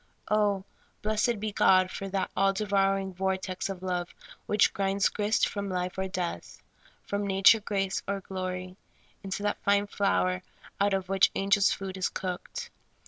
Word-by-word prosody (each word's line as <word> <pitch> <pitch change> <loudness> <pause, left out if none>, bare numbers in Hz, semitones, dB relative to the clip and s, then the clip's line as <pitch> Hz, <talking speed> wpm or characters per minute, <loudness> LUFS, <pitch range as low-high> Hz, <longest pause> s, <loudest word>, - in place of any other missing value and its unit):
Oh, 205 -2 +2 0.4
blessed 215 +1 +1
be 215 +1 -2
God 185 -2 +4
for 195 - -5
that 190 -1 -2
all 195 0 +3
devouring 195 -1 +1
vortex 190 0 -2
of 190 -1 -6
love 180 -1 -3 0.3
which 210 0 +3
grinds 195 0 +1
grist 210 +1 +1
from 200 -1 -4
life 180 -1 -2
or 190 0 -2
death, 180 -2 -4 0.4
from 200 0 -2
na 195 0 -1
ture, 225 +1 +8
grace, 195 -2 -1
or 200 0 -1
glory, 185 -1 -5 0.5
into 195 +1 -4
that 205 - -1
fine 200 0 +3
flour 185 -2 +1 0.4
out 200 0 +3
of 190 -1 -3
which 195 0 +4
angels' 195 +1 +3
food 190 -1 -4
is 185 - 0
cooked 180 -2 -5
195 Hz, 160 wpm, -28 LUFS, 185-200 Hz, 0.5 s, ture